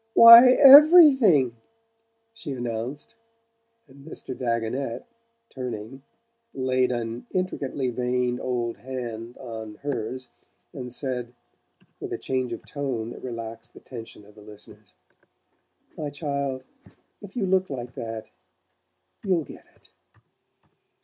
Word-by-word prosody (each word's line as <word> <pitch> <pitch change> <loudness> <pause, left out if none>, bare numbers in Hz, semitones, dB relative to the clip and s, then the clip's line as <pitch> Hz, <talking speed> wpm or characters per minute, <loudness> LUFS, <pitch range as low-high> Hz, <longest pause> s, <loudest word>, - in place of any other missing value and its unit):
"Why, 230 +2 +10
EVERYTHING!" 270 - +7 0.8
she 165 -11 -7
announced 120 +2 -6 0.7
and 140 0 -17
Mr. 140 -4 -9
Dagonet, 115 +1 -3 0.4
turning, 125 0 -7 0.5
laid 130 -1 0
an 120 -1 -5
intricately 140 -8 -3
veined 125 0 -2
old 120 -2 -3
hand 120 -2 -7
on, 110 -4 -8
hers, 130 -2 -4 0.4
and 125 -1 -8
said, 125 -2 -5 0.6
with - - -7
a - - -3
change 130 -2 -3
of 115 - -7
tone 125 -6 -4
that - - -11
relaxed 115 -1 -8
the - - -12
tension 115 -4 -11
of 105 - -19
the 105 - -17
listeners: 105 -1 -15 1.0
"My 150 -2 -5
child, 140 -3 -4 0.6
if 205 -1 -12
you 225 -6 -1
look 190 0 +1
like 125 -3 -7
that 115 -1 -7 1.0
you'll 185 -5 0
get - - -14
it." - - -23
125 Hz, 115 wpm, -24 LUFS, 115-145 Hz, 1.0 s, Why